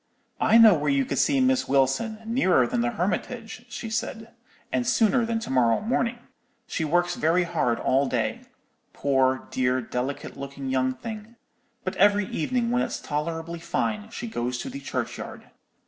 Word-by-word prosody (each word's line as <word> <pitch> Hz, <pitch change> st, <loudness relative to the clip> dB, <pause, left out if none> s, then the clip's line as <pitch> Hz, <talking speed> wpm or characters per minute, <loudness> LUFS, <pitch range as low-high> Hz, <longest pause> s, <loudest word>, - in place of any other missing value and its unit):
"'I 225 Hz, -, +5 dB
know 225 Hz, -3 st, +9 dB
where 150 Hz, -3 st, 0 dB
you 140 Hz, -1 st, +2 dB
could -, -, -2 dB
see 280 Hz, -2 st, +3 dB
Miss 260 Hz, 0 st, +2 dB
Wilson, 140 Hz, -, +1 dB
nearer 220 Hz, -, +3 dB
than 120 Hz, -, -1 dB
the 120 Hz, -, +1 dB
Hermitage,' 220 Hz, -, -3 dB
she 230 Hz, -1 st, -6 dB
said, 225 Hz, 0 st, -4 dB, 0.4 s
'and 125 Hz, -2 st, 0 dB
sooner 225 Hz, -, +3 dB
than 230 Hz, 0 st, 0 dB
to -, -, -5 dB
morrow 120 Hz, -3 st, +3 dB
morning. 235 Hz, +1 st, 0 dB, 0.5 s
She 180 Hz, -, -3 dB
works 175 Hz, +3 st, +1 dB
very 165 Hz, +3 st, +2 dB
hard 160 Hz, -9 st, 0 dB
all 135 Hz, +2 st, +2 dB
day,—poor, 130 Hz, -1 st, -2 dB
dear, 130 Hz, 0 st, +1 dB
delicate 130 Hz, +4 st, -4 dB
looking 140 Hz, -1 st, -6 dB
young 130 Hz, 0 st, +1 dB
thing; 220 Hz, -, -8 dB, 0.5 s
but 185 Hz, -, -3 dB
every 205 Hz, +1 st, +4 dB
evening 235 Hz, +8 st, -1 dB
when 245 Hz, +1 st, +2 dB
it's -, -, -2 dB
tolerably 165 Hz, +3 st, -3 dB
fine, 210 Hz, +5 st, -2 dB
she 235 Hz, -, -6 dB
goes 125 Hz, -, -2 dB
to 260 Hz, -, -5 dB
the 275 Hz, -, -6 dB
churchyard. -, -, -5 dB
175 Hz, 160 wpm, -26 LUFS, -, 0.5 s, know